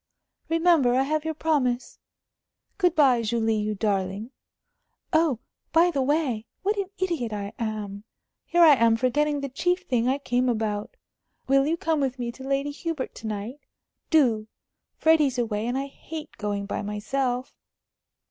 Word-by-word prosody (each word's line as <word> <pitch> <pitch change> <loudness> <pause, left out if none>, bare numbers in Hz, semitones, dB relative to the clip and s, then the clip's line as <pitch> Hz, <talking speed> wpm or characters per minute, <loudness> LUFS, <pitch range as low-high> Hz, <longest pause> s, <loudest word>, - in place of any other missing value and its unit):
"Remember, 325 -7 +4
I 265 - +3
have 305 +2 -1
your 320 -1 -2
promise. 265 -6 0 0.8
Good 360 -2 +3
bye, 265 -6 +5
Julie, 225 0 0
you 210 0 -1
darling!... 200 +2 -1 0.8
Oh, 315 -5 +3 0.4
by 340 +2 +5
the 280 -4 0
way, 260 -6 0 0.2
what 410 +2 +1
an 395 -2 -2
idiot 335 -11 -1
I 200 -1 -4
am! 210 -3 -4 0.4
Here 345 0 +4
am 245 -8 +6
I - - +3
forgetting 290 +4 +1
the 280 - -2
chief 355 +7 0
thing 245 -5 0
I 265 +2 +2
came 255 -2 0
about. 215 -3 -2 0.5
Will 275 +1 +4
you 330 +2 +1
come 325 -4 0
with 270 -2 -1
me 240 -1 -3
to 265 +3 -12
Lady 275 +1 -1
Hubert 315 -2 -4
to 220 - -8
night? 215 +6 -5 0.5
Do! 235 -9 +3 0.5
Freddie's 305 -5 +3
away, 225 -2 -1
and 245 +2 -1
I 275 - -1
hate 310 +2 -9
going 205 -1 -2
by 200 - -3
myself." 245 +5 -2
260 Hz, 155 wpm, -26 LUFS, 225-310 Hz, 0.8 s, am